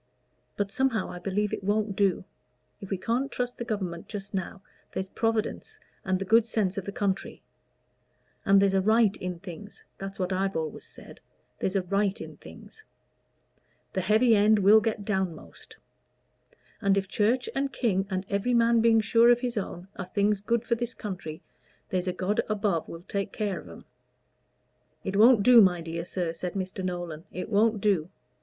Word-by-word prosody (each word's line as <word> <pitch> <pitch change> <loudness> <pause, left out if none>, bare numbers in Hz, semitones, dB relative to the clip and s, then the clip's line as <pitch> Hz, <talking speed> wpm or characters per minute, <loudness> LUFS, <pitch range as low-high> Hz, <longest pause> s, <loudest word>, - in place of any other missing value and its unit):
But 200 -1 -1
somehow, 260 -3 0
I 180 - -7
believe 200 +3 -1
it - - -4
won't 205 0 0
do: 195 -2 +1 0.5
if 195 - -9
we 195 - -1
can't 240 +8 -1
trust 245 0 -3
the - - -2
Government 190 -7 -4
just 200 -2 -7
now, 190 0 -4 0.3
there's 190 0 -4
Providence 225 0 -2 0.3
and 190 -1 0
the 195 - -4
good 225 +3 +4
sense 205 -5 0
of 195 - -4
the 200 - -4
country; 200 -1 -3 1.0
and 195 -1 +5
there's 195 -1 +3
a 190 - +3
right 215 0 +3
in 180 -1 -4
things 190 +3 -10 0.2
that's 195 0 -6
what 185 0 -1
I've 195 +1 -1
always 160 -2 -4
said - - -13 0.4
there's 190 - -1
a 190 - +2
right 200 +2 0
in - - -9
things. 435 - -14 1.1
The 190 - 0
heavy 220 +5 +4
end 210 +1 +5
will 205 +2 +6
get 215 -1 -2
downmost. 190 -6 -4 1.0
And 200 -2 +3
if 195 -1 0
Church 230 +5 +1
and 275 0 -1
King, 195 -7 0
and 190 0 -2
every 205 +5 0
man 230 0 +4
being 225 -1 +5
sure 230 +2 +4
of 240 0 +4
his 245 -2 -2
own, 185 -3 -5
are 190 - -4
things 200 +2 +1
good 235 +2 0
for 235 - +1
this 235 0 -2
country, 180 -6 -6 0.5
there's 185 0 -1
a - - +2
God 190 +3 0
above 200 -6 0
will 165 +1 -9
take 200 +1 -3
care 205 -5 -2
of 90 - -12
'em." 85 - -12 1.2
"It 190 - -3
won't 220 +1 +6
do, 245 0 +8
my 180 -3 +4
dear 165 0 -5
sir," 175 -2 -2
said 175 +1 -5
Mr. 190 0 -4
Nolan 175 -3 -4
"It 180 - -5
won't 215 +1 +3
do. 185 -5 +1
200 Hz, 180 wpm, -27 LUFS, 185-220 Hz, 1.2 s, do